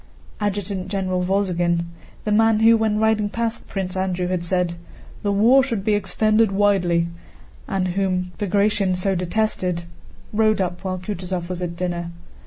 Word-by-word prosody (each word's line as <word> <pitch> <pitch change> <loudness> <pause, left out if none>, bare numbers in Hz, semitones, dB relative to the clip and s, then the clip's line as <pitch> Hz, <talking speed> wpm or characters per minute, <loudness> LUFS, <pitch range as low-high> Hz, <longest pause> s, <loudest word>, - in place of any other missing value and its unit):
Adjutant 200 -2 -2
General 185 -2 -1
Wolzogen, 175 -3 +1 0.4
the 210 - -1
man 220 0 +4
who 225 +1 +7
when 220 -1 +1
riding 215 -1 +2
past 230 +1 -3
Prince 190 -1 -3
Andrew 185 -1 -1
had 180 -2 -1
said, 180 0 0 0.5
"the 205 - 0
war 230 +7 +5
should 230 -7 -2
be 215 - +3
extended 215 +2 +2
widely," 190 -4 +2 0.6
and 185 -1 -1
whom 185 -1 -1
Bagratión 200 -2 +1
so 195 +2 0
detested, 180 -1 -1 0.5
rode 215 0 +3
up 180 -1 -2
while 185 -1 -2
Kutúzov 180 -2 -4
was 180 -1 -4
at 170 -1 -3
dinner. 175 -1 -3
190 Hz, 150 wpm, -22 LUFS, 180-210 Hz, 0.6 s, who